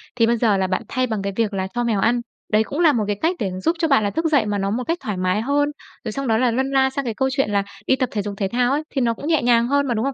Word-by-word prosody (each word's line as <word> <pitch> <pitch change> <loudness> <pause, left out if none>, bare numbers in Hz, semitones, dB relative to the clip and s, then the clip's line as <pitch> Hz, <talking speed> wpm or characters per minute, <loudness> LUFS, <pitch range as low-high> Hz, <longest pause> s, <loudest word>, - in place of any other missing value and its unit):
Thì 230 -2 +3
bây 235 0 +2
giờ 215 -4 +2
là 190 -1 0
bạn 185 0 -1
thay 255 -1 -1
bằng 220 -4 -2
cái 200 0 -3
việc 220 -3 0
là 190 -1 -2
cho 240 - -1
mèo 225 -4 0
ăn, 235 +3 +2 0.3
đấy 215 +1 +5
cũng 280 +7 -5
là 325 -4 +5
một 230 -4 +1
cái 205 - 0
cách 340 +3 +1
để 195 - -1
giúp 330 - +1
cho 325 - +2
bạn 275 -7 +3
là 205 - +1
thức 325 +9 -2
dậy 290 -8 +3
mà 205 -1 -1
nó 195 0 -1
một 250 +3 -1
cách 335 +1 0
thoải 210 -3 -4
mái 185 +3 0
hơn, 285 +4 +1 0.4
rồi 220 - -2
xong 275 +3 -4
đó 220 -1 +3
là 250 0 +2
lân 265 +3 0
la 265 -1 +3
sang 275 0 -4
cái 230 - -2
câu 265 +4 0
chuyện 270 -4 0
là 200 -1 +2 0.2
đi 265 - +4
tập 255 -2 -1
thể 210 - -1
dục 205 0 -5
thể 195 - 0
thao 245 +1 +2
ấy, 295 +2 0
thì 270 - -2
nó 235 -1 +2
cũng 285 - -7
nhẹ 320 -2 +2
nhàng 235 -1 +3
hơn 280 +1 +1
mà, 240 - 0
đúng 225 +2 -1
không? 275 - -1
240 Hz, 355 wpm, -21 LUFS, 210-275 Hz, 0.4 s, đấy